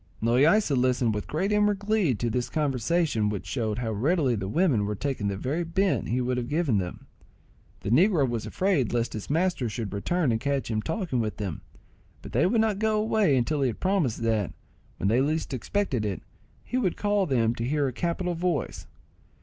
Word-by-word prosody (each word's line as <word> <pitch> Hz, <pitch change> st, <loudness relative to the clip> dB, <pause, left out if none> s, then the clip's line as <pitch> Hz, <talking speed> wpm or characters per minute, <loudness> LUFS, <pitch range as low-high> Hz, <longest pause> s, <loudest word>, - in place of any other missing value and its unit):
Loaysa 140 Hz, -, +3 dB
listened 125 Hz, -2 st, +2 dB
with 105 Hz, -, -4 dB
great 190 Hz, +7 st, -1 dB
inward 210 Hz, -1 st, +3 dB
glee 205 Hz, -, +1 dB
to 120 Hz, -, -2 dB
this 125 Hz, +1 st, -1 dB
conversation, 140 Hz, -4 st, 0 dB
which 105 Hz, -2 st, -4 dB
showed 110 Hz, -5 st, -2 dB
how 120 Hz, -2 st, -2 dB
readily 135 Hz, -, +1 dB
the 100 Hz, -4 st, -3 dB
women 125 Hz, -, +2 dB
were 105 Hz, -, -2 dB
taking 130 Hz, -3 st, -2 dB
the 100 Hz, -1 st, -2 dB
very 145 Hz, -, -2 dB
bent 185 Hz, +4 st, 0 dB
he 125 Hz, -, +1 dB
would 125 Hz, 0 st, -1 dB
have 120 Hz, -1 st, -3 dB
given 150 Hz, -, +1 dB
them. 90 Hz, -2 st, -6 dB, 0.8 s
The 100 Hz, -, -3 dB
negro 165 Hz, -, +4 dB
was 120 Hz, -3 st, -3 dB
afraid 180 Hz, -, 0 dB
lest 120 Hz, -1 st, 0 dB
his 110 Hz, -, -6 dB
master 160 Hz, -5 st, +1 dB
should 110 Hz, -2 st, -5 dB
return 150 Hz, -, 0 dB
and 110 Hz, 0 st, -1 dB
catch 140 Hz, -3 st, -1 dB
him 110 Hz, -1 st, 0 dB
talking 175 Hz, -, -2 dB
with 110 Hz, -2 st, -2 dB
them; 95 Hz, -7 st, -4 dB, 0.6 s
but -, -, -9 dB
they 150 Hz, +9 st, +3 dB
would 220 Hz, +3 st, +2 dB
not 215 Hz, -3 st, 0 dB
go 220 Hz, 0 st, +1 dB
away 210 Hz, -9 st, +2 dB
until 140 Hz, +4 st, 0 dB
he 135 Hz, -, +3 dB
had 120 Hz, -, -4 dB
promised 175 Hz, -, 0 dB
that, 110 Hz, -4 st, 0 dB, 0.5 s
when -, -, -1 dB
they 115 Hz, +5 st, +3 dB
least 155 Hz, +1 st, -1 dB
expected 130 Hz, -, -1 dB
it, 100 Hz, -3 st, -3 dB, 0.4 s
he 250 Hz, -, -3 dB
would 190 Hz, -9 st, 0 dB
call 205 Hz, -2 st, +1 dB
them 115 Hz, -5 st, +2 dB
to 115 Hz, -, -4 dB
hear 145 Hz, +3 st, +1 dB
a 130 Hz, -, -3 dB
capital 175 Hz, +5 st, -1 dB
voice. 170 Hz, -4 st, -2 dB
135 Hz, 200 wpm, -27 LUFS, 115-180 Hz, 0.8 s, negro